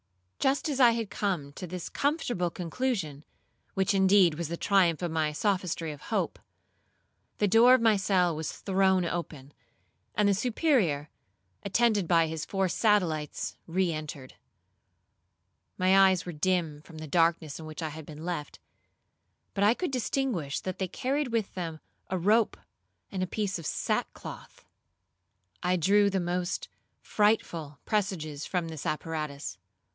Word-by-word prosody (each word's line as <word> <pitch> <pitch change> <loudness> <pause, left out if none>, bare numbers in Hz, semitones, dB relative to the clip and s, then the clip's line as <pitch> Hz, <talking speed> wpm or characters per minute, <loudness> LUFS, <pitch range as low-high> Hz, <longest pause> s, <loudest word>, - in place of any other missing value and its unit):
Just 270 +3 +1
as 280 -3 -2
I 245 -3 +7
had 230 -3 -3
come 170 -9 -2
to 180 - -7
this 180 0 -5
comfortable 250 - 0
conclusion, 175 - -3 0.5
which 190 +1 +2
indeed 190 -3 +5
was 165 +1 -4
the 170 +2 -4
triumph 180 -4 +3
of 170 -2 -2
the 155 -2 0
sophistry 180 -3 -1
of 145 - -10
hope, - - -1 1.0
the 205 - +2
door 235 +5 +7
of 255 - 0
my 225 -2 +5
cell 185 -3 +2
was 155 -1 -3
thrown 190 -2 +2
open, 155 -5 -5 0.6
and 210 -1 +3
the 200 - +4
Superior, 215 - +1 0.5
attended 210 -2 +2
by 165 -1 +4
his 160 -1 -4
four 195 -1 0
satellites 175 -7 0
re 175 0 +1
entered. 150 -4 -7 1.4
My 190 +1 +6
eyes 185 -1 0
were 175 - -4
dim 165 -2 0
from 160 +1 -13
the 155 - -6
darkness 165 -2 +1
in 160 - -8
which 155 +1 -6
I 160 - -2
had 155 0 -9
been 155 +1 -9
left, 170 -5 -4 1.0
but 200 - 0
I 215 +4 +5
could 360 0 -2
distinguish 245 - -1
that 185 -1 -5
they 190 - 0
carried 275 - -1
with 230 -4 -1
them 165 -4 -5 0.3
a 185 - 0
rope 210 +6 +3 0.5
and 190 - -3
a 185 - 0
piece 200 -1 -2
of 165 - -5
sackcloth. - - -4 1.0
I 180 +1 +2
drew 200 +4 +4
the 195 -1 0
most 175 +1 -2 0.4
frightful 170 -8 0
presages 175 -9 -2
from 175 -3 -1
this 160 -3 -6
apparatus. 150 - -4
180 Hz, 150 wpm, -29 LUFS, 160-205 Hz, 1.4 s, I